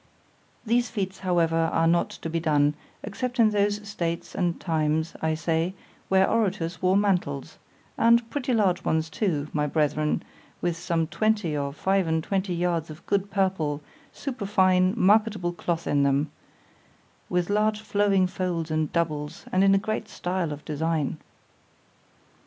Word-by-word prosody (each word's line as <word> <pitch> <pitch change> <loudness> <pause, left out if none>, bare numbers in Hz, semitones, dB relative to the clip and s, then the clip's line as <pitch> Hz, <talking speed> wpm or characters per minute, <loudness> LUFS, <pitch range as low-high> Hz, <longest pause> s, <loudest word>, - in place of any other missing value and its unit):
These 240 +2 +2
feats 195 -4 -3
however 175 -3 +1 0.2
are 165 - +2
not 170 +1 +3
to - - -7
be 165 - 0
done, 150 -3 +2 0.3
except 245 +5 -4
in 220 -2 +6
those 205 0 0
states 170 -5 -3
and 175 -1 -1
times, 160 -1 0
I 160 0 +1
say, 165 +3 -1 0.3
where 190 0 +4
orators 180 -7 -1
wore 185 +1 +3
mantles——and 200 - 0
pretty 270 -2 -2
large 195 -6 +2
ones 160 0 0
too, 155 -9 -1
my 150 -1 +1
brethren, 150 0 0 0.4
with 175 -1 -1
some 165 -1 -1
twenty 210 -2 0
or 140 -1 -2
five 190 +4 +1
and 160 0 0
twenty 190 -1 -1
yards 170 -2 -1
of 155 +2 -11
good 200 0 0
purple, 185 -7 0 0.3
superfine, 195 -7 +1
marketable 205 -3 +3
cloth 170 -1 -2
in 145 - +2
them—with 150 +5 -4
large 210 +1 +1
flowing 205 -3 +2
folds 175 -3 -2
and 155 -1 0
doubles, 155 -2 -2
and 185 +1 +3
in 195 0 +5
a - - +5
great 215 +1 -3
style 180 -4 -2
of 145 0 -7
design. 155 -1 -1
180 Hz, 145 wpm, -26 LUFS, 160-200 Hz, 0.4 s, in